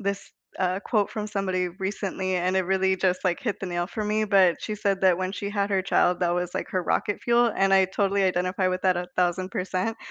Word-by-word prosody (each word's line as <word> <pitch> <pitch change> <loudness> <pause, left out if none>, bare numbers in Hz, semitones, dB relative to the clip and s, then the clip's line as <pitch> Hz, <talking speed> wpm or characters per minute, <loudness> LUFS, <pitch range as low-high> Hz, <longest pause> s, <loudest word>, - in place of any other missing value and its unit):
this, 200 0 -3 0.3
uh, 185 0 0
quote 210 -1 0
from 210 -1 -4
somebody 185 -3 -1
recently 190 0 -3
and 180 +1 0
it - - +2
really 190 0 +2
just, 185 0 0
like, 175 -2 0
hit 210 -5 -2
the - - -4
nail 175 0 -2
for 215 +2 -4
me, 215 +1 +1
but 190 -4 +4
she 215 - -4
said 200 -2 -1
that 185 -2 +4
when 185 0 -2
she 200 0 -4
had 200 0 -1
her 195 -1 +2
child, 180 -1 +2
that 175 -1 +1
was 180 0 -2
like - - -3
her 185 - -1
"rocket 205 +3 -1
fuel" 235 0 +3
and 195 0 +2
I 190 -1 +6
totally 195 +1 0
identify 185 0 +1
with 185 0 -2
that 185 -1 +3
1000%. 185 +3 -2
190 Hz, 225 wpm, -25 LUFS, 185-200 Hz, 0.3 s, I